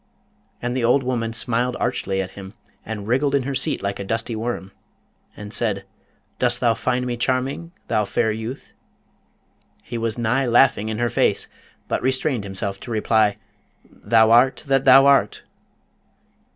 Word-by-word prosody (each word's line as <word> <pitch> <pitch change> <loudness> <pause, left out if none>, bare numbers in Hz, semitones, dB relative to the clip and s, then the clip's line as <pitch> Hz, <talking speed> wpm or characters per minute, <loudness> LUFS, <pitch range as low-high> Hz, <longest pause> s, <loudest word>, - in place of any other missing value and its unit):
And 125 0 -2
the 130 - -1
old 125 +4 +3
woman 120 -3 -2
smiled 120 +2 -1
archly 95 0 -1
at 95 - -9
him, 95 +1 -11 0.3
and 105 -2 -6
wriggled 135 +4 +1
in 140 - +1
her 140 +2 -3
seat 130 -5 -1
like 100 0 -3
a - - -3
dusty 115 +3 -2
worm, 110 -4 -4 0.7
and 105 0 -8
said, 100 -4 -1 0.5
'Dost 120 -1 +3
thou 120 -2 +3
find 125 +2 -1
me 120 -1 -2
charming, 130 +7 -2 0.2
thou 105 - +1
fair 110 +2 0
youth?' 110 +5 -7 1.1
He 120 -1 -5
was 115 0 -2
nigh 125 +3 0
laughing 120 -3 +3
in 110 - -3
her 120 +1 0
face, - - +1 0.4
but - - -1
restrained 130 -3 0
himself 100 0 -4
to - - -10
reply, 110 -2 +2 0.5
'Thou 110 -1 +2
art 125 +3 +4
that 135 -1 +1
thou 135 +1 +8
art!' 140 0 +3
120 Hz, 160 wpm, -22 LUFS, 110-130 Hz, 1.1 s, thou